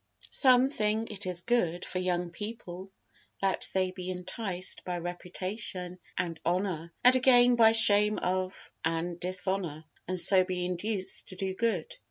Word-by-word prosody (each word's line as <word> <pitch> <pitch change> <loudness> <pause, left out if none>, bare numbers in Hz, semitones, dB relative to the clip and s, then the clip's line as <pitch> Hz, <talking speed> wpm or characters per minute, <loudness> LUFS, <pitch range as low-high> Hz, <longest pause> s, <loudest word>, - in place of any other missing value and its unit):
Some 255 0 +3
think 220 -2 -1
it 200 -2 -5
is 175 -1 -4
good 180 -8 0
for 185 - -3
young 180 -1 -2
people 195 -2 -8 0.5
that 195 -1 +1
they 185 -1 +1
be 185 0 -7
enticed 185 +1 -3
by 180 -1 -4
reputation 180 +1 -4 0.2
and 170 -3 -3
honor, 175 -2 -2
and 250 +1 +6
again 245 -1 +4
by 225 -1 +5
shame 210 -1 +7
of 185 +1 -3
and 165 +1 -2
dishonor, 180 -3 -1 0.2
and 185 0 0
so 185 +1 +5
be 180 -1 -3
induced 185 +2 -2
to 185 - -8
do 190 0 -3
good. 230 - -2
185 Hz, 150 wpm, -29 LUFS, 180-215 Hz, 0.5 s, shame